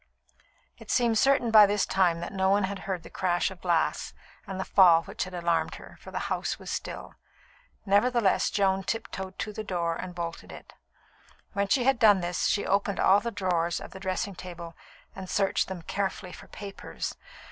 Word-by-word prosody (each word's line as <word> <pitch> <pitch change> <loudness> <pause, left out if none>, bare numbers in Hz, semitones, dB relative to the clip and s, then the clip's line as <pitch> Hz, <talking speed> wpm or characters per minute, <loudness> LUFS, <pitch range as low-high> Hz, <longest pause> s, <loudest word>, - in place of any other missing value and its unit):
It - - -14
seemed 235 -3 +2
certain 270 -4 +3
by 215 -2 +9
this 205 0 +1
time 175 -3 +1
that 175 - -6
no 190 -1 +1
one 200 +1 +3
had 195 0 -3
heard 180 -3 -2
the - - -11
crash 180 0 0
of 185 - -12
glass 170 -3 0 0.3
and 190 -1 -5
the 190 - -2
fall 170 -4 +6
which - - -4
had 185 0 -8
alarmed 170 -2 0
her, - - -12
for - - -11
the - - -5
house - - -2
was - - -8
still. - - -5 0.7
Nevertheless, 205 +1 +3
Joan 195 -1 +1
tiptoed 190 -3 -5
to 210 - -4
the 215 - -5
door 170 -4 -1
and 180 +1 -7
bolted 170 -1 -6
it. - - -12 0.8
When 200 0 0
she 245 +5 +2
had 265 -1 +2
done 205 -3 +6
this, 175 0 -1
she 205 - 0
opened 200 0 0
all 195 +2 +5
the 235 - -3
drawers 175 -5 -1
of - - -10
the 190 - -10
dressing 190 +1 -2
table 175 -2 -9 0.4
and 190 -2 -8
searched 195 0 +1
them 185 -3 -7
carefully 190 0 -3
for - - -12
papers. 200 -1 -7
190 Hz, 190 wpm, -27 LUFS, 175-205 Hz, 0.8 s, by